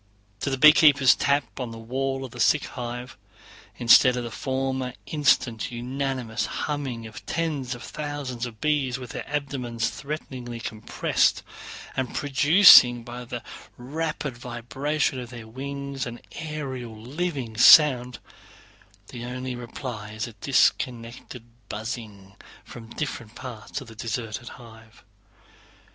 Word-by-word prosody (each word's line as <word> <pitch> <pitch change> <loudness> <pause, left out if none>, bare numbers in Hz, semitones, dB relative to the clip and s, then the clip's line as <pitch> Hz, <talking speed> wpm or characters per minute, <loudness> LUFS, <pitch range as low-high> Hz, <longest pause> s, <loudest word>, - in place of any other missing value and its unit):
To 140 - -2
the 135 - -1
beekeeper's 150 -3 +7
tap 140 -1 0
on 125 -2 -3
the 115 - -8
wall 135 +3 -3
of 130 - -10
the 120 - -11
sick 150 +5 +3
hive, 125 0 -7 0.6
instead 125 +1 +6
of 120 - -2
the 120 - -6
former 130 0 -2
instant 130 -7 +1
unanimous 125 -1 -3 0.2
humming 135 -6 -4
of 110 - -10
tens 145 -7 -2
of 120 - -11
thousands 145 -5 -5
of 110 -3 -12
bees 140 -3 0
with 125 -2 -9
their - - -7
abdomens 130 -5 -2
threateningly 130 -5 -6
compressed, 110 -1 0 0.5
and 130 -2 -3
producing 145 -4 +7
by 120 +1 -8
the 120 0 -6 0.3
rapid 150 +1 -4
vibration 130 +4 -2
of 120 -2 -7
their 120 -2 -9
wings 140 +2 -5
an 120 0 -7
aerial 135 -7 -6
living 135 -2 -4
sound, 125 0 +7 0.9
the 120 -2 -8
only 125 +1 -5
reply 120 -3 -7
is 110 +1 -3
a 120 - -10
disconnected 120 0 0 0.2
buzzing 105 -4 -7 0.3
from 115 -2 -11
different 120 -4 -5
parts 125 +2 -7
of 135 - -11
the 115 - -11
deserted 115 +1 -5
hive. 110 -1 -15
125 Hz, 130 wpm, -25 LUFS, 120-140 Hz, 0.9 s, beekeeper's